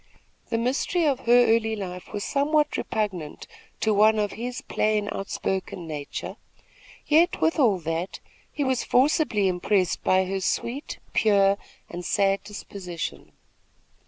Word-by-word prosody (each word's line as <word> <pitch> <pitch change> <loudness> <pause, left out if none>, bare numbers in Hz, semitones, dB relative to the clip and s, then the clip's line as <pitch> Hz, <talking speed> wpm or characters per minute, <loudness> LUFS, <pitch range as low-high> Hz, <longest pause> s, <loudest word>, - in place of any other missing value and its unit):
The 230 - 0
mystery 270 +8 0
of 280 -4 +2
her 245 +1 +7
early 220 -1 -1
life 180 -3 -7
was 205 - -3
somewhat 300 +1 +1
repugnant 190 -9 -3 0.4
to 220 - +2
one 215 +2 +5
of 205 -1 0
his 245 +2 -5
plain, 215 -1 0
outspoken 190 -2 -3
nature; 150 -3 -6 0.7
yet, 320 +3 +3
with 325 0 +1
all 225 -8 +4
that, 165 +3 -3 0.3
he 290 - -2
was 260 -2 0
forcibly 255 - +2
impressed 185 +1 0
by 185 0 +3
her 195 +1 -2
sweet, 245 +9 -2 0.2
pure 200 -2 +4 0.3
and 175 +1 -7
sad 195 +2 +1
disposition. 190 -4 -7
210 Hz, 130 wpm, -25 LUFS, 190-250 Hz, 0.7 s, her